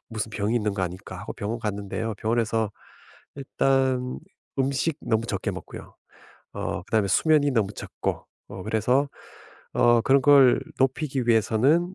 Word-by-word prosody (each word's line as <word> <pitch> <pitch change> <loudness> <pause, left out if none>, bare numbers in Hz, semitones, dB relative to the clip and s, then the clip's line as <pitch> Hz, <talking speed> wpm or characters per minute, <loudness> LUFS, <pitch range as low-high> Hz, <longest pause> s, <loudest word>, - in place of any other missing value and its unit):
무슨 110 -1 -4
병이 110 +1 -1
있는 105 -3 -1
거 95 - -2
아닐까?' 90 +2 -5
하고 - - -6
병원 110 +3 -4
갔는데요 105 +1 -3
병원에서 115 -1 0 0.7
일단 130 -2 0 0.4
음식 140 +3 0
너무 110 0 0
적게 100 -5 -2
먹고요 - - -10 0.6
어 - - -3
그다음에 110 -3 +1
수면이 150 - +3
너무 105 -5 0
적고 - - -4 0.2
어 95 -2 -8
그래서 125 +6 +1 0.7
어 120 -1 +4
그런 135 +2 +4
걸 140 -3 +6 0.2
높이기 135 -1 0
위해서는 130 - +3
115 Hz, 300 characters per minute, -25 LUFS, 110-135 Hz, 0.7 s, 걸